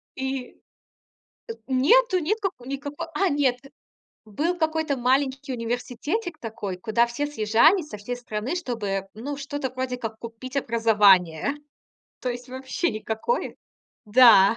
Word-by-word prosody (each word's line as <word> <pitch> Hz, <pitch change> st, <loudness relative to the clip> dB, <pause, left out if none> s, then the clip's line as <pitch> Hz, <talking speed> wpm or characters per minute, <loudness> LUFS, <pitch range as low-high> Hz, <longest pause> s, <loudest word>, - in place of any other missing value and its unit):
И 265 Hz, -1 st, -4 dB, 0.9 s
э, -, -, 0 dB
нету, 365 Hz, -, +4 dB
нет 415 Hz, +8 st, 0 dB
како 360 Hz, -11 st, -3 dB
никакой. 285 Hz, +4 st, -5 dB
А, 385 Hz, +3 st, +2 dB
нет. 275 Hz, -5 st, +2 dB, 0.7 s
Был 300 Hz, -, -1 dB
какой-то 315 Hz, -3 st, 0 dB
маленький 265 Hz, +2 st, +1 dB
университетик 250 Hz, -, -3 dB
такой, 205 Hz, -5 st, -5 dB
куда 235 Hz, +4 st, +2 dB
все 240 Hz, +5 st, -2 dB
съезжались 295 Hz, -, +3 dB
со 210 Hz, -, -7 dB
всей 230 Hz, +5 st, -5 dB
страны, 240 Hz, +5 st, -4 dB
чтобы, 205 Hz, -, -3 dB
ну, 280 Hz, +6 st, -5 dB
что-то 280 Hz, -2 st, -4 dB
вроде 255 Hz, -1 st, -3 dB
как 225 Hz, -2 st, -6 dB
купить 235 Hz, +3 st, -8 dB
образование. 210 Hz, -, +3 dB, 0.6 s
То 255 Hz, -, -2 dB
есть 245 Hz, +1 st, -6 dB
вообще 260 Hz, +7 st, -2 dB
никакое. 220 Hz, -, -2 dB, 0.5 s
Да. 225 Hz, -2 st, +7 dB
255 Hz, 130 wpm, -25 LUFS, 225-290 Hz, 0.9 s, Да